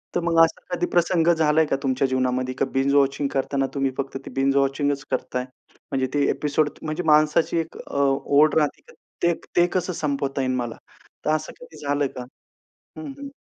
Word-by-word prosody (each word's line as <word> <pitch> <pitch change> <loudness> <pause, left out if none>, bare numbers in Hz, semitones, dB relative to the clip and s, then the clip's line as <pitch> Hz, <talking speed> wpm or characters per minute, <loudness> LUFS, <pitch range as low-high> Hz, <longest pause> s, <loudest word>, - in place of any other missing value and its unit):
तर - - +3
मग 165 -1 +2
असा 160 0 0
कधी 175 0 0
प्रसंग 170 -1 +2
झालाय 160 0 +3
का 140 - 0
तुमच्या 130 0 +1
जीवनामध्ये 130 0 0
का - - +2
बिंज 135 +1 +1
वॉचिंग 140 0 +2
करताना 135 0 0
तुम्ही 135 -1 0
फक्त 135 0 -3
ते - - -7
बिंज 135 +1 +2
वॉचिंग 140 +1 +2 0.2
करताय? 125 0 -2 0.5
म्हणजे 130 -1 0
ते 145 -1 +2
एपिसोड 150 0 +1
म्हणजे 155 +3 -3
माणसाची 155 +2 +3
एक 165 0 -5
अ, - - -5
ओढ 140 +2 +3
राहते 150 -2 +1
का 480 - -16 0.3
ते 170 0 +4 0.2
ते 175 - +5
कसं 185 0 -1
संपवता 140 -3 -2
येईल 130 -1 0
मला? 120 -2 -3 0.5
तर - - +1
असं 155 0 -5
कधी - - -13
झालंय 145 0 +1
का? 125 - -5 0.7
हं, 315 - -6
हं. 280 0 -7
145 Hz, 190 wpm, -23 LUFS, 135-160 Hz, 0.7 s, ते